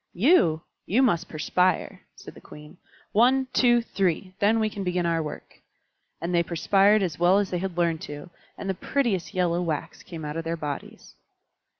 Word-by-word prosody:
"You! 175 Hz, -, +3 dB, 0.2 s
you 245 Hz, +7 st, +3 dB
must 175 Hz, -8 st, +1 dB
perspire," 180 Hz, +4 st, 0 dB
said -, -, -12 dB
the -, -, -15 dB
Queen. 150 Hz, +3 st, -13 dB, 0.3 s
"One, 255 Hz, +5 st, +3 dB
two, 240 Hz, -2 st, +4 dB
three! 185 Hz, -3 st, -1 dB
Then 215 Hz, +3 st, +3 dB
we 220 Hz, -, +1 dB
can 205 Hz, -2 st, -5 dB
begin 180 Hz, -1 st, -1 dB
our 165 Hz, -1 st, +1 dB
work." 150 Hz, -1 st, -8 dB, 0.6 s
And 170 Hz, +2 st, -3 dB
they 170 Hz, -, +4 dB
perspired 195 Hz, +5 st, +3 dB
as 170 Hz, -5 st, -3 dB
well 175 Hz, +3 st, +4 dB
as 200 Hz, -2 st, 0 dB
they 180 Hz, -, -1 dB
had 185 Hz, -1 st, -5 dB
learned 170 Hz, -2 st, +1 dB
to, 145 Hz, +4 st, -9 dB, 0.3 s
and -, -, -6 dB
the 190 Hz, -, 0 dB
prettiest 205 Hz, -2 st, -2 dB
yellow 175 Hz, -1 st, +1 dB
wax 160 Hz, -4 st, -4 dB
came 165 Hz, -3 st, -8 dB
out 150 Hz, +1 st, -5 dB
of 165 Hz, -, -3 dB
their 165 Hz, +1 st, -3 dB
bodies. 145 Hz, -2 st, -7 dB
180 Hz, 185 wpm, -25 LUFS, 165-205 Hz, 0.6 s, two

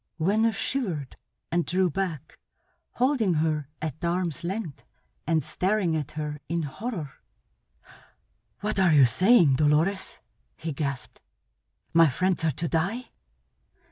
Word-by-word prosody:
Venner 215 Hz, +7 st, +3 dB
shivered, 195 Hz, -, -3 dB, 0.4 s
and 175 Hz, +1 st, +2 dB
drew 185 Hz, +2 st, +1 dB
back, 170 Hz, -4 st, -4 dB, 0.5 s
holding 245 Hz, -, +2 dB
her 155 Hz, -2 st, 0 dB, 0.2 s
at 155 Hz, +1 st, -5 dB
arms' 170 Hz, -1 st, -1 dB
length 180 Hz, -4 st, -4 dB, 0.4 s
and 160 Hz, -2 st, +2 dB
staring 190 Hz, -3 st, 0 dB
at 150 Hz, -3 st, -3 dB
her 150 Hz, -1 st, -4 dB
in 170 Hz, 0 st, -1 dB
horror. 165 Hz, -, -5 dB, 1.5 s
"What 210 Hz, -1 st, -1 dB
are 180 Hz, -4 st, +5 dB
you 140 Hz, -3 st, +7 dB
saying, 175 Hz, -, +5 dB
Dolores?" 155 Hz, +6 st, +1 dB, 0.4 s
he 160 Hz, -1 st, -5 dB
gasped. 140 Hz, -2 st, -4 dB, 0.7 s
"My 165 Hz, -2 st, +6 dB
friends 185 Hz, +5 st, 0 dB
are 160 Hz, -, +3 dB
to 165 Hz, +5 st, -3 dB
die?" 195 Hz, +11 st, -1 dB
170 Hz, 120 wpm, -26 LUFS, 150-195 Hz, 1.5 s, you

